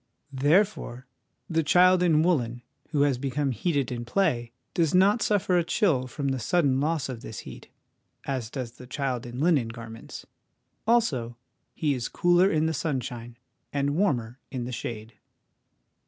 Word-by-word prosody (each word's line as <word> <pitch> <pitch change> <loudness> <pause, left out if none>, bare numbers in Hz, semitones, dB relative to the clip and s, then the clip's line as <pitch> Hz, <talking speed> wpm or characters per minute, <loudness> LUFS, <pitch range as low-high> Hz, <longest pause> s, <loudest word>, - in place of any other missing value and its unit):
Therefore 145 - +1 0.4
the 165 -1 +1
child 180 +4 +5
in 160 -3 +4
woollen, 120 -9 0 0.3
who 145 -2 +2
has 140 -4 +1
become 140 +1 -1
heated 140 - -1
in 120 -1 -3
play, 120 -4 0 0.2
does 165 0 +2
not 200 +5 +4
suffer 190 -4 +2
a - - +1
chill 160 - +1
from 140 +1 -3
the 135 -1 -1
sudden 140 0 +2
loss 155 0 0
of 125 -4 -6
this 110 -5 -7
heat, - - -11 0.5
as 130 -5 -3
does 125 -3 -5
the 125 +1 -13
child 130 -2 -3
in 120 +1 -7
linen 150 -6 +3
garments; 115 -1 -9 0.6
also, 135 - +1 0.4
he 150 -3 +1
is 125 -3 -3
cooler 175 +2 +4
in 155 -2 +1
the 160 - 0
sunshine, 120 -5 -4 0.3
and 140 0 0
warmer 130 - 0
in 130 -3 -4
the 125 - -5
shade. 115 -1 -6
140 Hz, 155 wpm, -27 LUFS, 120-165 Hz, 0.6 s, child